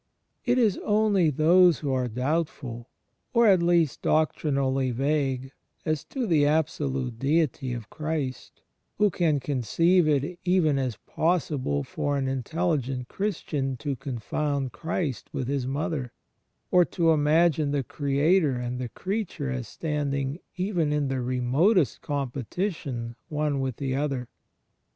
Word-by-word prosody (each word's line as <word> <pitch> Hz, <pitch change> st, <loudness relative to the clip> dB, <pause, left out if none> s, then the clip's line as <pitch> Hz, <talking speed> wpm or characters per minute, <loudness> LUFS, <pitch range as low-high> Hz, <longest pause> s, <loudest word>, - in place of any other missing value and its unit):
It 245 Hz, 0 st, +3 dB
is 220 Hz, -6 st, +3 dB
only 205 Hz, -5 st, +3 dB
those 170 Hz, +3 st, +5 dB
who 140 Hz, -, -1 dB
are 130 Hz, -1 st, 0 dB
doubtful, 125 Hz, -1 st, -2 dB, 0.5 s
or 235 Hz, 0 st, +6 dB
at 190 Hz, -5 st, +6 dB
least 170 Hz, -4 st, +2 dB
doctrinally 135 Hz, -4 st, +1 dB
vague, 135 Hz, 0 st, -1 dB, 0.3 s
as 155 Hz, -3 st, 0 dB
to 260 Hz, -3 st, -3 dB
the 160 Hz, -8 st, +3 dB
absolute 140 Hz, -5 st, 0 dB
Deity 140 Hz, -2 st, +1 dB
of 115 Hz, -3 st, -7 dB
Christ, 155 Hz, -5 st, -4 dB, 0.3 s
who 210 Hz, -1 st, +3 dB
can 160 Hz, -4 st, +1 dB
conceive 155 Hz, +7 st, +2 dB
it 150 Hz, +4 st, 0 dB
even 175 Hz, -6 st, +3 dB
as 130 Hz, -4 st, -1 dB
possible 145 Hz, -, 0 dB
for 145 Hz, -, -2 dB
an 135 Hz, -1 st, -1 dB
intelligent 135 Hz, -2 st, -1 dB
Christian 150 Hz, -9 st, -2 dB
to 140 Hz, +1 st, -3 dB
confoimd 135 Hz, +2 st, -2 dB
Christ 160 Hz, -1 st, -3 dB
with 130 Hz, -, -2 dB
His 135 Hz, -2 st, -1 dB
Mother, 140 Hz, -2 st, -2 dB, 0.6 s
or 180 Hz, -1 st, +6 dB
to 165 Hz, +1 st, +2 dB
imagine 155 Hz, 0 st, +3 dB
the 140 Hz, -1 st, 0 dB
Creator 145 Hz, +4 st, +2 dB
and 125 Hz, 0 st, -3 dB
the 125 Hz, -2 st, -3 dB
Creature 185 Hz, -, -3 dB
as 125 Hz, -3 st, -4 dB
standing 145 Hz, -, -2 dB, 0.2 s
even 180 Hz, -5 st, 0 dB
in 150 Hz, -2 st, 0 dB
th^ 130 Hz, -2 st, -1 dB
remotest 130 Hz, -, +2 dB
competition 135 Hz, -, -3 dB
one 150 Hz, -2 st, 0 dB
with 130 Hz, -3 st, -2 dB
the 135 Hz, 0 st, -2 dB
other. 135 Hz, -4 st, -2 dB
145 Hz, 130 wpm, -26 LUFS, 130-165 Hz, 0.6 s, or